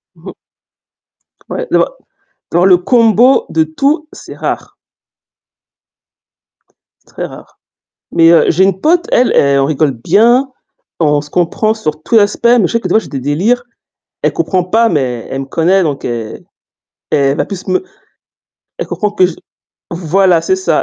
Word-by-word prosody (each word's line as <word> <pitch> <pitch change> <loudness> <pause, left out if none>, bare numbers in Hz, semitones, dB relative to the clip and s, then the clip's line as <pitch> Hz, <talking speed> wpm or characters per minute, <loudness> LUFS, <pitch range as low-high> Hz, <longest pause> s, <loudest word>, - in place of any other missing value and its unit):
Mmh. - - -11 1.1
Ouais, - - -5
d'avoir - - +1 0.6
dans 175 +2 +2
le 185 -1 +6
combo 230 +5 +3
de 160 - +2
tout, 280 - -1
c'est - - -11
rare. - - -5 2.3
C'est - - -25
très - - -4
rare, - - -13 0.5
mais 165 -1 +5
heu, 170 - +4
j'ai 185 +4 +3
une 190 -1 0
pote, 345 - +2
elle 250 - +3
elle 140 0 +3
on 135 - +1
rigole 150 -1 0
bien, 225 - +2 0.5
on 150 -2 +2
se 145 0 -13
comprend 180 +6 0
sur 155 -8 -4
tout 230 - 0
les 215 - +6
aspects, 205 +3 -3
mais 235 -5 +4
je - - -5
sais 230 - 0
que 185 - -4
des - - -1
fois - - +6
j'ai 220 - -6
des 135 - -5
délires, 180 - 0 0.6
elle - - 0
comprend 185 -2 -1
pas, 225 +5 +2
mais 125 -7 -2
elle 135 - -3
me - - -6
connaît, 175 +7 +1
donc 145 -4 -3
elle 115 -2 -5 0.7
elle 140 -1 +1
va - - 0
plus 190 -2 -8
me 185 - 0 0.9
elle 475 - -4
comprend 210 - -2
que 185 -3 +3
je 180 - -6 0.6
voilà, 175 +1 +1
c'est 375 - 0
ça, 375 - 0
185 Hz, 170 wpm, -13 LUFS, 155-225 Hz, 2.3 s, le